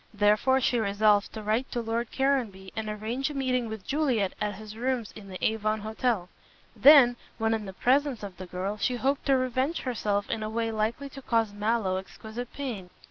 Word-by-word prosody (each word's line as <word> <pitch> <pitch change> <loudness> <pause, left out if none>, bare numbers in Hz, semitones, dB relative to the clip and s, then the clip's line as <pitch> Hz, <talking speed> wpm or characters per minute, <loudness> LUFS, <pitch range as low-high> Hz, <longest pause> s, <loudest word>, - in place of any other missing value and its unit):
Therefore 210 +6 +4
she 245 -2 +1
resolved 205 0 +3
to 220 - -6
write 220 +5 0
to 240 - -1
Lord 230 0 -2
Caranby 235 -9 0
and 220 -1 -3
arrange 225 +6 -2
a 295 - -7
meeting 255 -3 0
with 220 -3 -7
Juliet 260 -10 +1
at 210 -1 -1
his 215 +1 -10
rooms 245 -1 -2
in 210 -2 -10
the 185 -1 -7
Avon 215 -1 0
Hotel. 220 -3 -1 0.5
Then, 265 -4 +8 0.2
when 225 0 +1
in 215 -2 -2
the 190 - -7
presence 265 +2 +1
of 195 -3 -7
the 185 0 -8
girl, 190 +4 -3
she 250 +4 0
hoped 270 +4 -1
to 270 -1 +5
revenge 255 +5 0
herself 210 -5 -1
in 225 - -2
a 215 - -3
way 225 +1 -1
likely 220 +5 -1
to 275 0 -10
cause 225 -4 +1
Mallow 210 -2 0
exquisite 220 +5 -7
pain. 230 -10 -5
225 Hz, 195 wpm, -28 LUFS, 210-255 Hz, 0.5 s, Then